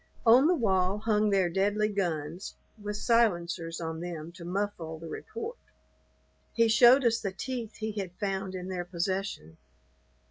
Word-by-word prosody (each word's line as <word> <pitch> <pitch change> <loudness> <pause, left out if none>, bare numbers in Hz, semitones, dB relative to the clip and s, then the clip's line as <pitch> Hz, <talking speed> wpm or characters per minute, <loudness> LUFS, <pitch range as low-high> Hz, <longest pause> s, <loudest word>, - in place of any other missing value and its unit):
On 245 +6 +7
the 355 - +4
wall 190 - +1
hung 215 -1 +1
their 195 -3 +3
deadly 200 +4 +1
guns, 175 -4 -3 0.3
with 210 0 -4
silencers 175 -8 +1
on 160 -1 -4
them 170 -2 -6
to 170 0 -12
muffle 175 -3 -3
the 165 +1 -9
report. 455 - -6 1.0
He 230 -1 +4
showed 245 +4 +7
us 230 -1 +3
the 195 - -3
teeth 235 +2 -5
he 220 0 -3
had 200 -4 -4
found 195 -1 -3
in 180 0 -5
their 185 -1 -3
possession. 175 - -3
195 Hz, 150 wpm, -29 LUFS, 175-220 Hz, 1.0 s, On